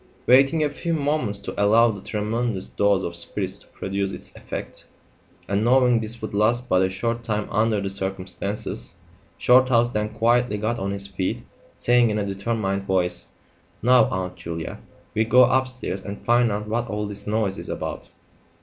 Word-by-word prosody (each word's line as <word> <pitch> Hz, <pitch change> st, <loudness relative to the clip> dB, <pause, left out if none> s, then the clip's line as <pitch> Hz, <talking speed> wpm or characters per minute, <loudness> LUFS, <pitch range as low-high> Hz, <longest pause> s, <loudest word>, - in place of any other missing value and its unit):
Waiting 135 Hz, +5 st, +5 dB
a 150 Hz, -, +1 dB
few 165 Hz, +3 st, -2 dB
moments 140 Hz, -9 st, -1 dB
to 100 Hz, -, -2 dB
allow 115 Hz, +3 st, +5 dB
the 100 Hz, -3 st, -8 dB
tremendous 105 Hz, -1 st, -2 dB
dose 100 Hz, -2 st, +2 dB
of 85 Hz, -, -4 dB
spirits 85 Hz, -, -2 dB
to -, -, -19 dB
produce 100 Hz, 0 st, -3 dB
its -, -, -10 dB
effect, -, -, -7 dB, 0.6 s
and 100 Hz, +1 st, 0 dB
knowing 125 Hz, 0 st, +4 dB
this 115 Hz, +1 st, -6 dB
would 110 Hz, -, -4 dB
last 115 Hz, +4 st, +1 dB
but 90 Hz, -, +3 dB
a 95 Hz, -, +2 dB
short 115 Hz, +5 st, -2 dB
time 105 Hz, -2 st, -2 dB
under 110 Hz, 0 st, +2 dB
the 100 Hz, -1 st, -3 dB
circumstances, 95 Hz, +1 st, -4 dB, 0.4 s
Shorthouse 125 Hz, -1 st, +4 dB
then 105 Hz, -1 st, -1 dB
quietly 115 Hz, 0 st, +2 dB
got 110 Hz, +3 st, -1 dB
on 95 Hz, -, -2 dB
his 100 Hz, 0 st, -4 dB
feet, 95 Hz, -1 st, -3 dB, 0.3 s
saying 120 Hz, -1 st, +4 dB
in 105 Hz, -, -1 dB
a 105 Hz, -, -1 dB
determined 100 Hz, -1 st, -2 dB
voice 90 Hz, -2 st, 0 dB, 0.6 s
"Now, 125 Hz, +1 st, +6 dB
Aunt 90 Hz, -1 st, -3 dB
Julia, 85 Hz, -1 st, -6 dB, 0.3 s
we'll 110 Hz, +1 st, 0 dB
go 125 Hz, +1 st, +7 dB
upstairs 130 Hz, -5 st, 0 dB
and 100 Hz, +1 st, -8 dB
find 120 Hz, -1 st, +4 dB
out 105 Hz, +1 st, -3 dB
what 115 Hz, +2 st, -1 dB
all 105 Hz, 0 st, -2 dB
this 105 Hz, 0 st, -7 dB
noise 105 Hz, -2 st, 0 dB
is -, -, -8 dB
about. -, -, -5 dB
105 Hz, 175 wpm, -23 LUFS, 100-120 Hz, 0.6 s, go